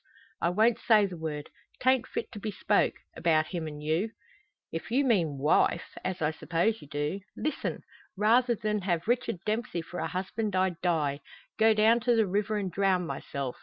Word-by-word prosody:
"I 170 - +2
won't 220 +6 +3
say 215 -3 +5
the 185 -2 -5
word. 155 -2 -5 0.3
'Tain't 255 -1 +3
fit - - -4
to 210 - -8
be 215 - -3
spoke 205 - +1 0.2
about 160 -2 +2
him 170 -4 -3
an' 150 -1 -7
you." 160 +8 0 0.6
"If - - -5
you 270 +4 +2
mean 170 - +2
wife 150 +4 +2
as 185 -3 -2
I 150 - +2
suppose 175 +7 0
you - - -12
do 145 +6 -2 0.2
listen! 305 - -3 0.3
Rather 235 +4 +4
than 210 -1 -1
have 175 -1 -1
Richard 240 -5 +1
Dempsey 215 -6 -2
for 175 +2 -7
a - - -1
husband, 200 +2 -3
I'd 185 -2 +1
die 155 -5 +1 0.4
go 220 0 +5
down 220 +2 +5
to 240 0 +2
the 220 -1 +4
river 205 +3 0
and 195 -3 -2
drown 190 -1 +2
myself! 140 -5 -4
190 Hz, 185 wpm, -29 LUFS, 165-220 Hz, 0.6 s, say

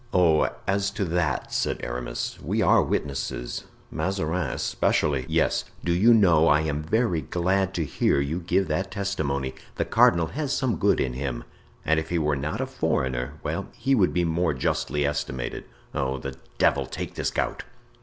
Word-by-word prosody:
"Oh! 85 -4 +4 0.2
as 100 0 +1
to 100 - +1
that," 85 -4 -1
said - - 0
Aramis, - - -4
"we - - -1
are - - +5
witnesses. 70 -3 -3 0.3
Mazarin 90 -3 -1
especially——" 70 -4 0
"Yes, - - +2 0.2
do 85 - +1
you 105 +7 +5
know, 85 -8 +5
I 75 +1 +5
am 75 -1 -1
very 90 +1 +1
glad 95 +5 0
to 80 - 0
hear 70 - +1
you 70 +5 -1
give 90 +2 +1
that 95 +6 -1
testimony; 80 -10 -2 0.2
the - - -1
cardinal 85 -1 +4
has 145 -1 -2
some 125 -8 0
good - - +3
in 65 - 0
him, 65 -2 -3 0.4
and 80 +1 +3
if 80 0 -6
he 85 - 0
were 75 -2 +1
not 70 +3 -3
a - - 0
foreigner—well, 60 -2 -2
he 130 +3 +1
would 100 -8 +4
be 90 -1 +1
more 80 -1 +1
justly 70 +3 0
estimated. 65 -4 -3 0.3
Oh! 65 0 -1
the 70 0 -6 0.2
devil - - +2
take - - -5
this - - -1
gout!" - - -2
80 Hz, 170 wpm, -25 LUFS, 70-95 Hz, 0.4 s, are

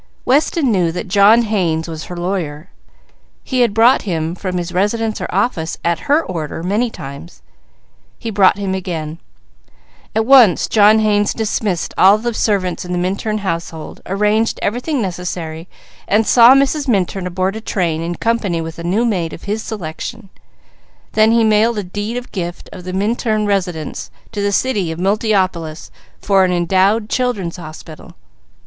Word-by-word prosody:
Weston 285 0 +2
knew 180 -5 +1
that 180 +5 -5
John 205 +5 +5
Haynes 175 -7 -1
was 160 -1 -6
her 180 - -8
lawyer; 175 -3 -4 0.7
he 255 - -2
had 240 -3 +3
brought 230 +5 +4
him 165 -4 -2
from 185 0 -4
his 175 0 -3
residence 215 +4 -1
or - - -2
office 180 -5 -1
at 170 - -1
her 300 +3 +4
order 165 -2 -5
many 210 +7 0
times; 135 - -10 0.7
he 225 - -5
brought 195 -1 +4
him 195 -2 -2
again. 165 -4 -4 1.0
At 220 0 +2
once 245 -8 +6
John 215 0 +5
Haynes 205 -1 +1
dismissed 210 -5 -2
all 195 +3 +7
the 235 +2 -3
servants 195 -5 0
in 180 0 -5
the - - -1
Minturn 195 +4 -1
household, 165 -2 -5
arranged 210 +4 +1
everything 250 +4 -1
necessary, 175 -3 -5 0.4
and 215 +2 +2
saw 240 +3 +7
Mrs. 275 +1 +1
Minturn 195 -4 0
aboard 185 +2 -1
a 220 - -6
train 170 -7 -1
in 170 +1 -3
company 210 -5 -1
with 165 0 -6
a - - -6
new 195 +8 +1
maid 180 -8 -1
of - - -10
his 210 +2 -2
selection; 195 +2 -7 0.8
then 215 +1 +4
he 230 0 +4
mailed 220 +1 +3
a 205 - -2
deed 205 +6 -4
of 245 - -7
gift 175 -3 -6
of 180 - -10
the 185 - -4
Minturn 215 +2 0
residence 180 -6 -2 0.2
to 210 -2 -4
the 200 0 0
city 200 -6 0
of 160 - -6
Multiopolis 190 -5 -1 0.3
for 195 -1 +3
an 185 - +2
endowed 190 +5 +2
Children's 215 -10 -2
Hospital. 155 -2 -11
195 Hz, 165 wpm, -17 LUFS, 175-220 Hz, 1.0 s, all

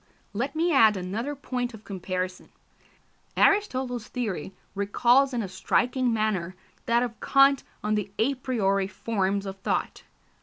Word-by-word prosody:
Let 265 +8 -2
me 335 +1 +2
add 220 -6 +6
another 215 +10 -3
point 250 -3 -4
of 215 - -14
comparison. 185 -2 -4 0.9
Aristotle's 260 - +2
theory 200 -9 -4 0.2
recalls 240 +7 +3
in 240 -3 -1
a - - -4
striking 245 +6 +1
manner 210 -5 -1 0.3
that 235 +1 +3
of 235 -2 -5
Kant 275 0 +4 0.2
on 210 0 0
the 205 -2 -1
a 270 +5 +2
priori 205 -7 0
forms 200 -1 -1
of 195 0 -6
thought. - - -2
225 Hz, 140 wpm, -26 LUFS, 195-255 Hz, 0.9 s, add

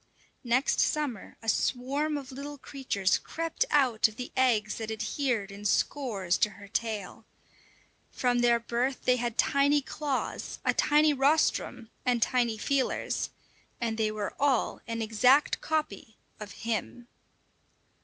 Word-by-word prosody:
Next 250 +3 +1
summer 290 -9 -1
a - - -10
swarm 275 +7 0
of 275 -1 -8
little 285 +2 -7
creatures 255 -9 -1
crept 330 +8 -2
out 255 -8 +4
of 215 - -12
the 250 +1 -6
eggs 225 -5 +2
that 220 -1 -4
adhered 220 -1 -2
in 200 +1 -10
scores 205 -4 0
to 210 - +3
her 200 - -12
tail. 220 -1 -3 0.9
From 245 -1 +1
their 240 -1 +4
birth 240 +3 -2
they 250 0 +4
had 240 -1 -3
tiny 285 +1 +3
claws, 285 0 -3
a - - +3
tiny 300 0 +4
rostrum, 270 -4 +1
and 245 -1 +2
tiny 235 -1 +1
feelers; 270 +4 -1 0.5
and 230 -2 -1
they 215 -1 +2
were 215 -1 -4
all 275 -4 +1
an 230 0 -2
exact 250 +6 +3
copy 300 -9 -3 0.2
of 210 -2 -8
him. 235 +2 -3
245 Hz, 135 wpm, -29 LUFS, 220-280 Hz, 0.9 s, out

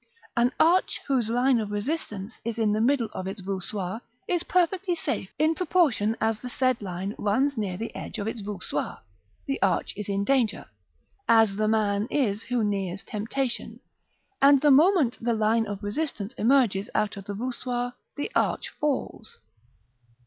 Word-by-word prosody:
An 240 +1 +3
arch 345 +4 +3
whose 255 -5 +1
line 245 +1 +3
of 215 -2 -3
resistance 210 -2 -4
is 230 0 -3
in 220 -2 +2
the 215 - +1
middle 245 -1 +2
of 185 - -4
its 195 +2 -5
voussoirs 190 +2 -3 0.3
is 350 -2 +1
perfectly 360 +1 +1
safe: 195 - -3
in 310 +2 +3
proportion 300 - +2
as 220 -1 +1
the 250 - -7
said 255 -1 +1
line 190 +1 -4
runs 260 +8 +1
near 200 -5 -2
the 225 +3 -5
edge - - -6
of 205 - -3
its 225 0 -4
voussoirs, 200 -2 -3 0.5
the 275 -2 -2
arch 190 -3 +1
is 210 0 -6
in 200 0 0
danger, 240 -3 +1 0.6
as 225 -3 +5
the 215 +1 +1
man 210 -1 +1
is 220 -8 +1
who 245 -2 -1
nears 195 -2 -2
temptation; 235 +4 -3 0.6
and 280 0 +7
the 295 -1 +5
moment 295 - +4
the 235 -1 +1
line 220 +1 +2
of 200 -1 -5
resistance 225 -1 -3
emerges 230 -6 +2
out 210 -2 +1
of 200 -1 -9
the 205 - -5
voussoirs 245 +1 -3 0.2
the 290 +10 -3
arch - - 0
falls. 275 -6 -2
225 Hz, 165 wpm, -26 LUFS, 205-270 Hz, 0.6 s, and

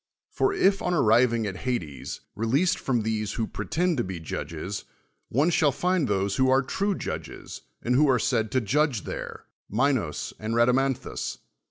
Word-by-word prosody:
For 400 - +2
i[', 200 - +3
on 180 0 0
arriving 115 -3 +4
at 95 -3 -4
Hades, 85 - -4
released 130 - +1
from 120 -4 0
these 110 -2 -1
who 115 - -1
]^retend 175 +7 -1
to 120 - +1
be 95 -3 -5
judges, 80 +4 -5 0.4
one 145 +8 +2
shall 150 -3 +3
find 180 +1 +1
those 100 -1 0
who 130 - +4
nve 130 0 +3
true 200 0 0
judges, 80 - -6 0.2
and 120 - +1
who 145 +3 +4
are 130 - +5
said 110 -1 +1
to 130 - +3
judge 130 0 +1
there, - - -6 0.3
^linos 120 - 0
and 110 +1 -2
Rhadamanthus 125 +2 +1
125 Hz, 165 wpm, -26 LUFS, 105-145 Hz, 0.4 s, are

